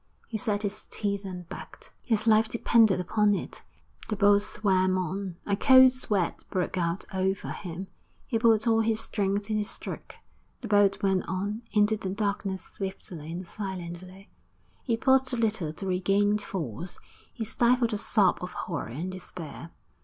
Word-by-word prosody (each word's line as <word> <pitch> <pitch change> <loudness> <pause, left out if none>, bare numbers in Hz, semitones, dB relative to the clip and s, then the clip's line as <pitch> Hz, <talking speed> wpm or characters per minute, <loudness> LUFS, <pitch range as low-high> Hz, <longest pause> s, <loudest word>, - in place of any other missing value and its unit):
He 225 - -3
set 210 -3 -1
his 205 0 -4
teeth 200 -1 -2
and 180 -2 -7
backed; - - -10
his 220 -2 0
life 220 0 +5
depended 225 -4 +4
upon 205 +3 +2
it. - - -6 0.5
The 215 - 0
boat 200 0 +5
swam 190 -3 +1
on. 185 +1 -3
A 200 - +1
cold 260 +3 +7
sweat 210 -8 -1
broke 185 -1 -1
out 170 0 -1
over 190 0 -1
him; 180 0 -6 0.4
he 230 -4 -1
put 225 -2 +4
all 225 -1 +4
his 225 0 +1
strength 205 -1 -1
in 215 - +1
his 210 -1 -1
stroke. - - -7 0.5
The - - -5
boat 205 -2 +3
went 190 -1 +1
on 205 +4 -2
into 210 +1 +3
the 195 -3 -4
darkness 200 -1 -2
swiftly 180 -5 -7
and 180 +2 -5
silently. 185 -1 -7 0.5
He 230 - 0
paused 265 +2 +3
a - - -4
little 215 -8 0
to 175 +5 -8
regain 195 +3 +2
force; 175 - -5 0.3
he 225 - -5
stifled 235 +1 +2
a - - 0
sob 200 -4 +3
of 180 - -5
horror 170 - -4
and 155 +11 -4
despair. 165 -6 -8
200 Hz, 165 wpm, -28 LUFS, 185-215 Hz, 0.5 s, cold